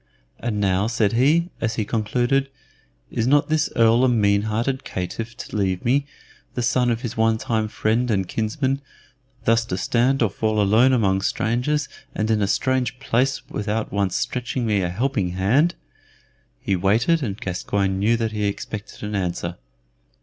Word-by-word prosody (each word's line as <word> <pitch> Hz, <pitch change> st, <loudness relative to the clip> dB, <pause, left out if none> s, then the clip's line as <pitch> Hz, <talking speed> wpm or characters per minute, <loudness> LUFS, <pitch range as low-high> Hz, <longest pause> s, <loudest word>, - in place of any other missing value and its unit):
"And 115 Hz, -3 st, -2 dB
now," 95 Hz, 0 st, +2 dB
said 115 Hz, -3 st, +1 dB
he, 155 Hz, +9 st, +3 dB
as 115 Hz, 0 st, -1 dB
he 110 Hz, -, -1 dB
concluded, 120 Hz, +5 st, 0 dB, 0.6 s
"is 115 Hz, -, -1 dB
not 145 Hz, +3 st, +3 dB
this 155 Hz, -1 st, +1 dB
Earl 115 Hz, +2 st, +4 dB
a 130 Hz, -, +4 dB
mean 100 Hz, -4 st, +3 dB
hearted 125 Hz, +5 st, -1 dB
caitiff 115 Hz, +6 st, -5 dB
to -, -, -8 dB
leave 95 Hz, -3 st, -1 dB
me, 140 Hz, +4 st, +2 dB, 0.5 s
the 125 Hz, -, -1 dB
son 120 Hz, +1 st, +2 dB
of 115 Hz, 0 st, -1 dB
his 120 Hz, -3 st, -4 dB
one 110 Hz, 0 st, +2 dB
time 110 Hz, -1 st, -1 dB
friend 110 Hz, +3 st, 0 dB
and 95 Hz, -4 st, +1 dB
kinsman, 130 Hz, -, -1 dB, 0.6 s
thus 115 Hz, 0 st, +4 dB
to 90 Hz, -, -3 dB
stand 125 Hz, +6 st, +2 dB
or 110 Hz, -, +2 dB
to -, -, -24 dB
fall 110 Hz, -1 st, 0 dB
alone 110 Hz, +6 st, +4 dB
among 100 Hz, -6 st, +2 dB
strangers 125 Hz, +9 st, 0 dB, 0.3 s
and 110 Hz, +1 st, 0 dB
in 110 Hz, -1 st, +2 dB
a 100 Hz, -, +2 dB
strange 125 Hz, +4 st, 0 dB
place 135 Hz, 0 st, 0 dB
without 105 Hz, +1 st, -3 dB
once 100 Hz, -3 st, 0 dB
stretching 125 Hz, 0 st, -2 dB
me 105 Hz, -3 st, +1 dB
a 90 Hz, -, -1 dB
helping 100 Hz, -2 st, -1 dB
hand?" 125 Hz, -, +2 dB, 0.8 s
He 95 Hz, -, 0 dB
waited, 110 Hz, -, +2 dB
and 105 Hz, -6 st, -3 dB
Gascoyne 95 Hz, +1 st, -1 dB
knew 115 Hz, +4 st, +3 dB
that 115 Hz, -1 st, -1 dB
he 105 Hz, -1 st, -2 dB
expected 100 Hz, +1 st, -5 dB
an 105 Hz, 0 st, -4 dB
answer. 90 Hz, -3 st, -2 dB
115 Hz, 170 wpm, -22 LUFS, 100-125 Hz, 0.8 s, Earl